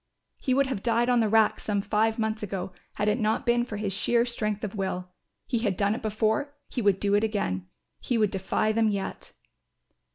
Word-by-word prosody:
He 255 - +1
would 275 +1 +4
have 260 -7 -3
died 235 +1 +2
on 245 -1 +4
the 220 -2 +2
rack 220 0 +4
some 205 -2 -1
five 220 +2 +1
months 220 -1 -1
ago 190 -2 -4 0.2
had 205 - -1
it 210 +4 +2
not 215 -1 0
been 240 0 +3
for 220 -4 -5
his 205 -2 -2
sheer 235 +4 +2
strength 215 -4 -2
of 210 - -3
will. 190 -3 -3 0.4
He 240 - -1
had 205 -5 0
done 205 0 +2
it 225 - -5
before, 220 +6 0
he 245 - -2
would 200 -3 +3
do 200 -1 +1
it 205 +1 +4
again; 95 - -1 0.3
he 245 - -1
would 210 -3 +2
defy 195 +2 0
them 220 0 +2
yet. 200 -2 -4
215 Hz, 215 wpm, -27 LUFS, 200-230 Hz, 0.4 s, would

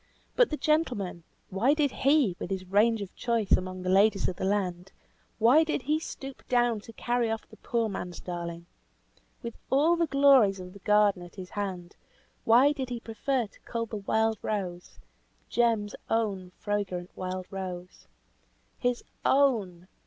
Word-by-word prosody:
But - - +5
the 305 - -3
gentleman; 250 - 0 0.3
why 235 +10 +3
did 295 -3 +1
he, 275 - +3
with - - -5
his 190 -1 -3
range 210 +3 +3
of 190 - -11
choice 230 -4 -1
among 185 0 +1
the 185 - -2
ladies 195 +1 +4
of 185 - -3
the - - -2
land, 190 -2 -1 0.5
why 245 +8 +6
did 310 -4 -2
he 305 +3 +1
stoop 270 -4 -8
down 240 -3 +2
to 225 +2 -13
carry 240 0 0
off 225 0 -4
the - - -16
poor 230 -2 -1
man's 180 -4 -5
darling? 170 -1 -6 0.8
With 235 -1 -7
all 300 +6 +4
the 335 -1 +1
glories 270 -9 +5
of 180 0 -9
the 200 - -12
garden 210 -2 +3
at 175 0 -12
his 185 -2 -9
hand, 190 -4 -5 0.5
why 250 +6 +6
did 270 -4 -4
he 240 -1 -4
prefer 235 +3 -1
to 205 - -19
cull 230 -1 -4
the 220 -1 -6
wild 220 +2 0
rose, 180 -4 -4 0.5
Jem's 225 -3 +1 0.2
own 200 -5 -1
fragrant 195 -4 -3
wild 185 0 -4
rose? 180 - -7 0.7
His 245 -1 0 0.2
_own! 215 -11 +2
210 Hz, 165 wpm, -28 LUFS, 185-245 Hz, 0.8 s, why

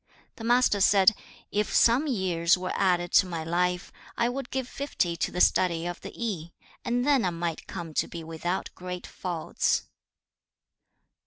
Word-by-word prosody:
The 225 - -8
Master 240 -3 +3
said, 195 +1 +6 0.4
'If 210 +1 0
some 245 +7 +4
years 185 - +2
were 185 0 -4
added 175 -2 +1
to 185 - +5
my 165 -3 -4
life, 180 +2 -1 0.3
I 235 - +2
would 260 0 -5
give 265 -2 -3
fifty 230 -12 -2
to - - -1
the 180 - -4
study 170 -2 +3
of 175 0 -5
the - - -8
Yi, 180 -8 -4 0.3
and 245 +1 0
then 280 -5 +3
I 185 - +2
might 170 -1 -4
come 170 -4 -6
to - - 0
be 170 -1 -7
without 165 +3 -3
great 180 0 -7
faults.' 170 -4 -1
180 Hz, 165 wpm, -27 LUFS, 170-230 Hz, 0.4 s, said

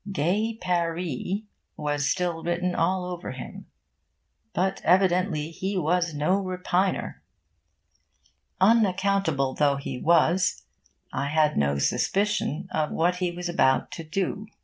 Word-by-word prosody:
'Gay 200 +7 0
Paree' 175 - -2 0.3
was 145 -1 -1
still 175 -3 -1
written 175 +1 -1
all 180 +2 +1
over 180 -6 -5
him. 130 - -9 0.8
But 190 +7 -1
evidently 180 -4 +2
he 190 +4 -3
was 175 -1 +1
no 180 +7 +1
repiner. 185 0 -1 1.4
Unaccountable 195 - +2
though 145 -1 +2
he 140 -2 -5
was, 170 +3 +3 0.5
I 140 - -1
had 150 0 +2
no 70 0 +1
suspicion 195 - 0
of 155 -1 0
what 175 +2 +1
he 180 -1 0
was 175 +1 -5
about 130 -7 +2
to 165 - -6
do. 195 +6 -3
175 Hz, 120 wpm, -26 LUFS, 155-190 Hz, 1.4 s, was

